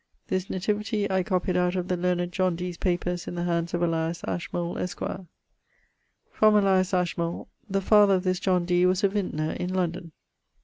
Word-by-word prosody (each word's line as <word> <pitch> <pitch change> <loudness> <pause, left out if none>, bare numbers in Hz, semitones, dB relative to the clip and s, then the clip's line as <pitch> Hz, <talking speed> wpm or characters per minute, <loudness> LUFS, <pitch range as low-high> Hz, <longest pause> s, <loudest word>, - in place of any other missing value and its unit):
this 185 -1 0
nativity[DO] 205 +2 -1
I 190 0 +2
copied 185 -1 -1
out 180 0 +1
of 180 -1 -2
the 180 - 0
learned 175 0 0
John 185 -1 +1
Dee's 180 +1 -4
papers 175 0 -2
in - - -5
the 175 - -2
hands 170 0 -1
of 175 - -1
Elias 165 0 -1
Ashmole, 175 0 -3
esq. 180 - -4 1.3
From 215 0 +4
Elias 190 -2 +3
Ashmole 175 -2 -1 0.2
the 195 0 0
father 205 0 +5
of 180 - -1
this 185 -1 0
John 185 -3 +1
Dee 180 0 +3
was 185 +2 +1
a 200 - +5
vintner 180 -6 -2
in... 180 - -3
London. 175 -2 -2
180 Hz, 180 wpm, -26 LUFS, 175-190 Hz, 1.3 s, father